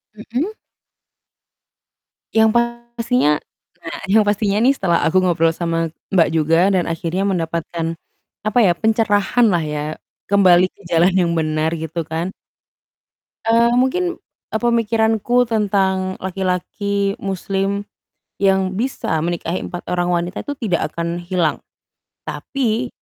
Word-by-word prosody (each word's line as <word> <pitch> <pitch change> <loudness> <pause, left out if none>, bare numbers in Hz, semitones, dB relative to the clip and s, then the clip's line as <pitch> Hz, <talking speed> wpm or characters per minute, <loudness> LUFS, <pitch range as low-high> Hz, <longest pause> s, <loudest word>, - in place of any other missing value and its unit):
Mhm. 250 - -3 1.8
Yang 220 0 +4 0.5
pastinya 235 -8 +2 0.5
nah, 165 - -6
yang 215 +2 +5
pastinya 205 0 +1
nih 265 - +6
setelah 170 -3 +2
aku 180 +4 +2
ngobrol 170 -3 +2
sama 165 -1 -2 0.2
Mbak 165 -3 +4
juga 165 +4 +3
dan 185 -2 +1
akhirnya 165 +3 -2
mendapatkan, 165 -2 -2 0.6
apa 220 +3 +2
ya, 180 - +5
pencerahanlah 215 -3 +2
ya, 150 0 -3 0.5
kembali 185 -3 +6
ke - - -23
jalan 170 +3 +4
yang 175 -2 +2
benar, 155 0 0
gitu, 160 +1 -4
kan. 165 +3 -3 1.1
Eee, 235 +1 +4
mungkin, 350 +8 +1 0.4
e - - -2
pemikiranku 230 +1 +2
tentang 195 -4 0
laki-laki 195 +2 -1
muslim, 195 +1 -2 0.6
yang 190 -1 +2
bisa 235 -9 -1
menikahi 170 +1 -2
4 175 - -6
orang 175 0 +1
wanita 175 +3 -3
itu 285 - -3
tidak 180 -6 +1
akan 170 +1 -2
hilang, 175 -2 0 0.7
tapi, 245 -2 -2
190 Hz, 115 wpm, -19 LUFS, 170-220 Hz, 1.8 s, nih